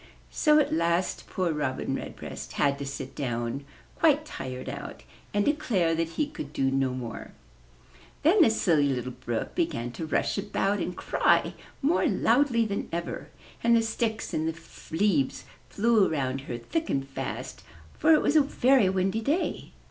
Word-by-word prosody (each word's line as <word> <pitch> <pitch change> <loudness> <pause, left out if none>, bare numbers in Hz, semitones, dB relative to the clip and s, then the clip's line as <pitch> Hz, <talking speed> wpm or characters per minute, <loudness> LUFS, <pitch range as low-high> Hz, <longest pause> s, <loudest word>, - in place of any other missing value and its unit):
So 300 -1 +4
at 300 - +2
last 170 +2 0
poor 180 -3 -1
Robin 145 -4 -2
Redbreast - - -6
had 140 -1 +1
to 140 - -4
sit 135 -1 -6
down, 120 +1 -3 0.3
quite 310 -2 +4
tired 130 - -6
out, - - -7 0.3
and 205 0 +1
declare 215 - +1
that 165 0 0
he 300 - +2
could 285 - -8
do 135 0 +1
no 135 -1 +1
more. 120 -3 -7 0.9
Then 355 +7 +5
the 305 - +7
Silly 165 -9 +3
Little 125 -1 -2
Brook 120 -2 -4
began 125 - -1
to 160 +6 -6
rush 155 - 0
about 200 0 0
and 180 - -3
cry - - +2 0.3
more 315 +5 +3
loudly 245 -5 +3
than 200 -2 -3
ever; 170 0 -4 0.4
and 235 0 +5
the 230 - +4
sticks 220 0 -2
and 155 +1 0 0.4
leaves 160 -5 +1 0.3
flew 220 -2 +3
around 135 -3 -1
her 120 -3 -5
thick 320 - -3
and 135 0 -1
fast, 135 - -5 0.4
for 320 - +5
it 305 - +4
was 290 - +2
a 310 - +8
very 265 -6 +3
windy 190 +3 0
day. 295 +10 -1
180 Hz, 165 wpm, -27 LUFS, -, 0.9 s, a